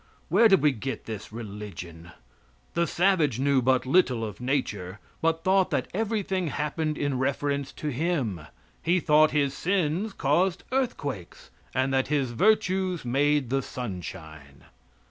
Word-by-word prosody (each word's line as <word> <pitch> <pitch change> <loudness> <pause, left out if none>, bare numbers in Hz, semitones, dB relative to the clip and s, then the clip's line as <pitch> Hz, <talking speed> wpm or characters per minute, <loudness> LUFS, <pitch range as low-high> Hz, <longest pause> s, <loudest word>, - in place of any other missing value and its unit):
Where 210 +7 +6
did 195 -6 +4
we 150 - +5
get 130 +2 -5
this 110 -2 -7
religion? 100 -6 -8 0.6
The 170 0 +1
savage 170 - +2
knew 140 -1 +3
but 130 +1 +2
little 130 -6 +3
of 105 +1 -8
nature, 105 -8 -2 0.2
but 165 0 +1
thought 190 0 +3
that - - -1
everything 200 -3 -1
happened 150 +1 -2
in 140 -3 -1
reference 140 +1 -1
to 150 - -4
him. 135 - -1 0.4
He 175 +2 +2
thought 155 -1 +5
his 140 -2 +1
sins 180 +4 0
caused 170 +6 +1
earthquakes, 145 - -3 0.2
and 130 +1 +1
that 130 0 +2
his 140 -4 0
virtues 185 - +1
made 140 +1 +1
the 135 0 +2
sunshine. 80 - -8
140 Hz, 140 wpm, -27 LUFS, 120-175 Hz, 0.6 s, Where